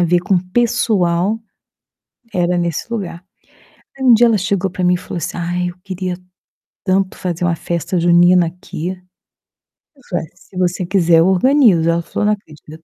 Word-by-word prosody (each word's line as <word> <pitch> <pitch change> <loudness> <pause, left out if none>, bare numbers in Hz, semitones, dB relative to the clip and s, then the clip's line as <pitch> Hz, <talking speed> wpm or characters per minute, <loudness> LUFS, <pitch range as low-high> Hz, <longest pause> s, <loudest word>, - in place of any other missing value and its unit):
a - - +4
ver 175 +1 +2
com 190 +1 +1
pessoal, 195 -1 +1 1.0
era 180 -1 +1
nesse 170 +6 -3
lugar. 180 -6 -5 0.7
Aí, 265 - -6
um 245 - +7
dia 235 +2 +6
ela 225 -2 +3
chegou 195 0 -1
para 180 0 -4
mim 180 0 +3
e - - -2
falou 180 - -7
assim: 170 - -4
"Ai, 175 +1 -2
eu 175 - -10
queria 185 -1 -4 0.7
tanto 190 0 0
fazer 175 -1 -3
uma 170 -1 +1
festa 170 +2 -2
junina 175 +1 +5
aqui". 170 -1 -6 1.1
Eu 275 - -23
falei: 175 - -2
"Ué, - - -20
se 185 0 -16
você 180 0 0
quiser, 170 -3 +3
eu 165 - +4
organizo", 210 - +4
aí 165 - +1
ela 170 0 +1
falou: 205 - -3
"Não 210 - +3
acredito". 160 -4 -11
180 Hz, 180 wpm, -17 LUFS, 170-195 Hz, 1.1 s, um